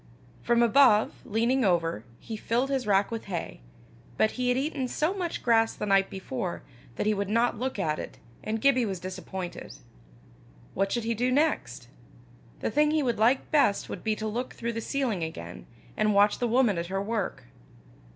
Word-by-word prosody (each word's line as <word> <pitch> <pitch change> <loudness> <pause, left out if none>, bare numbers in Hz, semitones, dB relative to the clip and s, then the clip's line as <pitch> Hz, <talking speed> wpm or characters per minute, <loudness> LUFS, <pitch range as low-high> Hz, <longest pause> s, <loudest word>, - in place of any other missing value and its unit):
From 235 0 +3
above, 235 -3 +5
leaning 235 +5 +1
over, 165 - +1 0.2
he 225 - -7
filled 240 +5 -1
his 265 -5 -1
rack 200 +1 +3
with 225 -1 -4
hay; 180 -4 -5 0.6
but 220 - +3
he 250 0 -2
had 250 - +2
eaten 270 -1 -1
so 310 +8 0
much 360 -4 -4
grass 225 -1 +3
the - - -4
night 195 -1 +3
before, 190 0 -5 0.3
that - - -2
he 215 - +3
would 200 -1 -2
not 230 +1 +1
look 260 -1 -2
at 155 -6 -1
it, - - -7 0.3
and 220 +1 -2
Gibbie 255 -2 +3
was 190 -3 -4
disappointed. 185 0 -7 1.0
What 195 +1 0
should 235 - -1
he 230 +1 0
do 245 +3 0
next? 255 - 0 0.7
The - - -1
thing 300 +3 +3
he 310 -1 +1
would 240 -4 -1
like 245 +5 +2
best 285 -10 +2
would - - -6
be 220 -1 0
to 220 0 -4
look 240 +4 -3
through 235 0 -3
the 230 - -3
ceiling 235 -9 -1
again, 85 - -7 0.3
and 215 -1 +1
watch 205 +1 +4
the 245 - +1
woman 235 -6 +2
at 170 - -4
her 195 +2 -2
work. 205 0 -3
225 Hz, 190 wpm, -27 LUFS, 195-250 Hz, 1.0 s, above